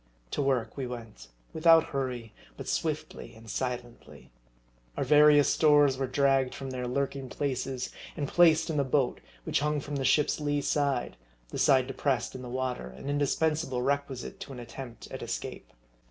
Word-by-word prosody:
To - - -1
work 130 -4 0
we 135 -2 -3
went, 115 - -9 0.3
without 165 0 +6
hurry, 125 -5 -3 0.2
but - - -7
swiftly 155 -6 -3
and 115 0 -15
si 130 - -1
lently. 120 -1 -8 0.7
Our - - +1
various 150 -1 +6
stores 145 -3 +5
were 135 0 -2
dragged 135 -1 +2
from 135 -1 -6
their 125 -1 -3
lurking 135 +1 -2
places, 130 -2 -3 0.3
and 145 - -2
placed 165 0 +4
in 155 - -2
the 140 - +3
boat, 130 -1 0 0.2
which - - 0
hung 150 +1 0
from 145 +1 -5
the 135 - -2
ship's 150 +4 +2
lee 145 -1 0
side, 140 -3 0 0.3
the - - -5
side 130 -2 +5
depressed 135 -1 -1
in 130 - -7
the 125 - -7
water, 130 - -3
an 65 - -6
indispensable 145 -2 0
requisite 140 +5 -2
to 195 - -8
an 130 - -8
attempt 120 0 -9
at - - -6
escape. - - -5
135 Hz, 170 wpm, -29 LUFS, 125-145 Hz, 0.7 s, without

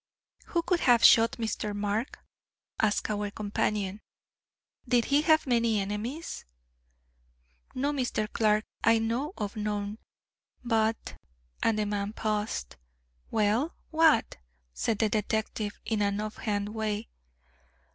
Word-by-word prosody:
"Who 340 -1 0
could 350 0 +1
have 240 -5 +4
shot 225 0 +7
Mr. 215 -2 -3
Mark?" 205 +4 -2 0.6
asked 215 -1 +1
our 205 0 -2
companion, 205 -1 -2 0.9
"did 240 -1 +3
he 285 +1 +3
have 315 0 +4
many 230 -4 +2
enemies?" 215 +11 -4 1.3
"No, 280 +3 0
Mr. 250 -6 -1
Clark. 215 -1 +2 0.2
I 230 -1 +5
know 230 +7 -1
of 205 -2 -4
none. 210 0 -3 0.7
But 225 -1 0 0.2
" - - -35
and 225 -1 +2
the 210 - +1
man 205 0 -2
paused. 210 - -2 0.5
"Well, 220 +8 +1 0.2
what?" 315 - +4 0.4
said 220 - -1
the 220 0 +2
detective 215 0 -2
in 220 -1 0
an 200 0 +1
off 215 0 -4
hand 205 -2 -2
way. 215 0 -3
215 Hz, 125 wpm, -29 LUFS, 210-235 Hz, 1.3 s, shot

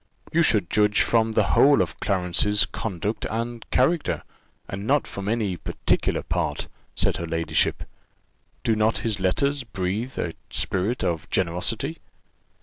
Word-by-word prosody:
"You 170 - +4
should 105 - +2
judge 105 0 +3
from 115 -1 +2
the - - +4
whole 145 0 +6
of - - -1
Clarence's 100 +2 +2
conduct 105 +1 -3
and 115 +1 -3
character, 155 +6 +1 0.4
and 100 +2 -5
not 145 +1 +3
from 100 +1 -4
any 105 -5 0
particular - - 0
part," 80 -3 -2 0.3
said - - +1
her 85 - -4
ladyship. 80 0 0 0.8
"Do 110 - +2
not 110 +1 +2
his 110 -3 0
letters 140 +9 +1
breathe 105 +3 -3
a 85 - -2 0.2
spirit 100 +7 -1
of 80 -2 -2
generosity?" 105 - -1
105 Hz, 140 wpm, -24 LUFS, 90-120 Hz, 0.8 s, whole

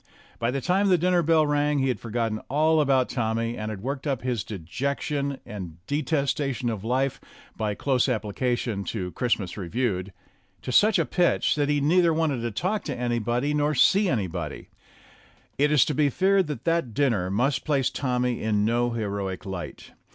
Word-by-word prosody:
By 115 - 0
the 135 +2 -2
time 190 +7 +2
that 190 - +4
the - - +5
dinner 180 +1 +2
bell 160 -1 +3
rang, 145 0 +1
he 135 -1 +1
had 125 - -1
forgotten 115 -1 -2
all 155 +3 +3
about 135 -3 +3
Tommy, 115 -1 -1
and 110 -1 -4
had 105 -2 -6
worked 140 +3 -3
up 135 -4 -1
his 125 -5 -1
dejection 140 - -3
and 95 -8 -7
detestation 140 -3 -1
of 105 -3 -5
life 130 +3 0 0.3
(by 105 -2 -2
close 130 +1 +1
applica 120 +1 -1
tion 105 -5 -3
to 90 -5 -4
"Christmas 110 -6 -1
Reviewed") 100 -1 -2 0.5
to - - -4
such 210 - +5
a - - +2
pitch 180 -2 +2
that 145 -1 0
he 145 0 +2
neither 165 +2 +3
wanted 155 -6 0
to 120 - -1
talk 185 - -2
to 140 - -3
anybody 120 +3 0
nor 150 0 +1
see 195 +8 +4
anybody. 90 - -3 0.9
It 145 +1 +3
is 150 -5 +5
to 150 - -1
be 145 -1 +2
feared 190 +4 +2
that 145 -5 -5
that 165 -9 0
dinner 115 -10 +1
must 125 +8 0
place 140 -4 +1
Tommy 125 -2 -1
in 105 -1 +1
no 120 +2 +1
heroic 100 -4 -3
light. 95 -3 -7
125 Hz, 180 wpm, -25 LUFS, 110-150 Hz, 0.9 s, the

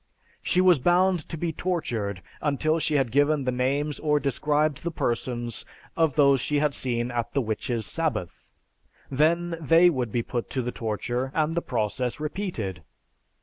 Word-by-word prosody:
She 180 - +2
was 180 -5 +5
bound 175 +3 +2
to 165 - -4
be 165 +1 -2
tortured 115 - -2 0.2
until 155 +2 +1
she 155 -1 0
had 130 -5 +1
given 145 +2 +3
the 130 - 0
names 140 +4 -1
or 150 -1 +2
described 150 +1 0
the 170 - -2
persons 120 -5 -2 0.3
of 160 -4 +2
those 140 -3 +5
she 150 +3 0
had 145 0 +1
seen 120 -2 -1
at 120 -1 -3
the - - +4
"witches' 110 0 -2
sabbath." 125 - -3 0.6
Then 165 +5 +2
they 165 +4 +6
would 125 -7 -2
be 120 +1 0
put 120 0 -4
to 130 - -2
the 125 - -2
torture 120 +4 -3
and 155 0 +1
the 170 - 0
process 120 +1 -2
repeated. 150 - -4
140 Hz, 165 wpm, -26 LUFS, 120-160 Hz, 0.6 s, they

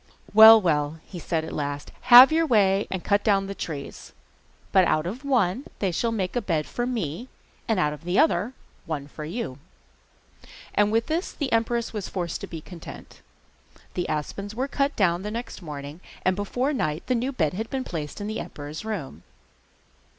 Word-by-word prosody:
'Well, 220 +1 +10
well,' 155 -4 0
he 180 - -9
said 160 -1 -2
at - - -7
last, 145 -1 -4 0.2
'have 250 +4 +11
your 325 +1 +2
way 200 -5 +3
and 190 -2 -4
cut 205 0 +2
down 200 -3 +2
the 195 - -5
trees; 150 -7 -7 0.6
but 190 - +5
out 155 -1 +1
of 225 +10 -5
one 250 -4 +1
they 195 -3 0
shall 230 +7 0
make 195 -3 -2
a 245 - +1
bed 165 -7 -1
for 240 0 -3
me, 225 - -3 0.4
and 225 -4 +1
out 150 -4 +1
of 150 - -11
the 175 +2 -1
other, 235 - +2 0.3
one 145 -3 -4
for 150 +1 -8
you!' 165 - -5 1.1
And 205 0 +3
with 225 +1 +2
this 330 +4 -2
the 280 -4 -4
empress 230 +1 0
was 210 -3 -4
forced 175 -3 -4
to - - -6
be 165 -2 -7
content. 170 0 -11 0.7
The 180 -1 -3
aspens 195 +7 -4
were 260 +3 -1
cut 280 +1 -1
down 175 -3 +2
next 220 +2 -6
morning, 145 0 -8 0.2
and 185 - +3
before 245 +8 -1
night 155 - -2
the 255 - 0
new 250 +3 -1
bed 160 - 0
had 220 +5 -4
been 265 -1 -2
placed 155 - -6
in 205 - -4
the 215 +1 -3
emperor's 150 +4 -7
room. 165 - -5
195 Hz, 185 wpm, -25 LUFS, 160-230 Hz, 1.1 s, have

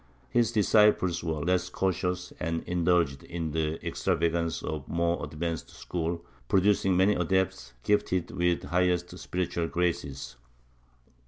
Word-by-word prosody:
^ - - -31 0.3
His 115 -2 +3
disciples 105 -5 +3
were 80 -3 -2
less 90 0 +1
cautious 90 -1 -1
and 80 +1 -2
indulged 85 -5 +1
in 85 -2 -4
the 80 0 0
extravagance 85 0 0
of 75 -2 -4
the - - -9
more 85 0 +1
advanced 80 +2 -4
school, 85 0 -4 0.2
producing 95 0 +3
many 95 +3 +5
adepts 90 -9 0
gifted 95 -4 +1
with 90 0 +1
the - - -9
highest 90 0 +1
spiritual 85 -2 -2
graces. 80 -7 -2
85 Hz, 135 wpm, -28 LUFS, 80-90 Hz, 0.3 s, many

